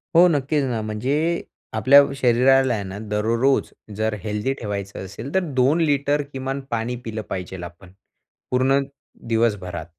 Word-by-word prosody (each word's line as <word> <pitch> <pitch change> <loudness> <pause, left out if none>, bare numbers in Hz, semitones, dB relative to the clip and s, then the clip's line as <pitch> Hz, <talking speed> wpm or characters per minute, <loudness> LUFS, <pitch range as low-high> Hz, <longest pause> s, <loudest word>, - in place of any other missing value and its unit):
हो, 175 +2 +8
नक्कीच 145 -2 +1
ना. 120 -4 -1
म्हणजे 140 +11 -1 0.3
आपल्या 140 +2 +7
शरीराला 130 0 +4
आहे 105 -3 -2
ना, 95 +1 -7
दररोज 115 +5 +1 0.2
जर 110 0 -1
हेल्दी 105 +5 -1
ठेवायचं 100 -3 -5
असेल, 110 +9 -8
तर 190 - +4
2 135 +6 +3
लिटर 145 -1 +2
किमान 135 +1 -3
पाणी 115 +2 -1
पिलं 110 -1 -4
पाहिजे 95 0 -5
आपण, 85 +1 -11 0.6
पूर्ण 130 +2 +3 0.5
दिवसभरात. 105 -8 0
120 Hz, 140 wpm, -22 LUFS, 105-135 Hz, 0.6 s, हो